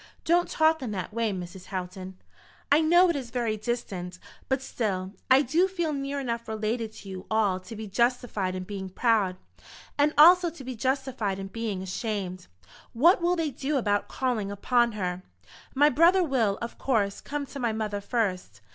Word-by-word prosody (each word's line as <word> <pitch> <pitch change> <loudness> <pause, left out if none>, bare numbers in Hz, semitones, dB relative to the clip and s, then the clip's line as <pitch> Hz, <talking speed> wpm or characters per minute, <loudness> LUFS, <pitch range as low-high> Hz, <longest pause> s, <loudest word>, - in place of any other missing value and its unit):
"Don't 345 +1 +3
talk 315 0 +3
in 255 - -4
that 185 +1 -5
way, 230 -1 0
Mrs. 180 -1 -7
Houghton." 185 -1 -6 0.5
"I 295 +2 +6
know 345 +3 +5
it - - -4
is 260 -4 -4
very 230 -2 -1
distant; 200 -6 -4 0.3
but 265 0 +2
still, 195 -7 -3 0.2
I 260 +2 +6
do 330 +8 +2
feel 345 -5 -2
near 280 0 -3
enough 235 -3 -3
related 220 +1 -2
to 195 - -11
you 190 0 -8
all 210 -4 +2
to 225 +5 -10
be 220 +1 -6
justified 215 -3 0
in 185 - -4
being 190 0 -6
proud, 205 -2 +1 0.6
and 290 +1 +4
also 350 +3 +8
to 320 -4 -11
be 255 0 -6
justified 255 -5 -1
in 195 0 -6
being 210 -3 -4
ashamed. 190 -2 -4 0.5
What 340 +10 +5
will 350 +1 +2
they 325 -4 -1
do 275 +3 -2
about 205 -5 0
calling 240 -6 -1
upon 235 +4 +1
her?" 180 -3 -3 0.5
"My 290 +2 +6
brother 345 +7 +5
will, 235 - +1
of 235 - -7
course, 210 -7 0
come 290 0 -4
to 280 - -9
my 235 -3 0
mother 215 -2 -3
first. 195 - -2
230 Hz, 180 wpm, -27 LUFS, 195-275 Hz, 0.6 s, also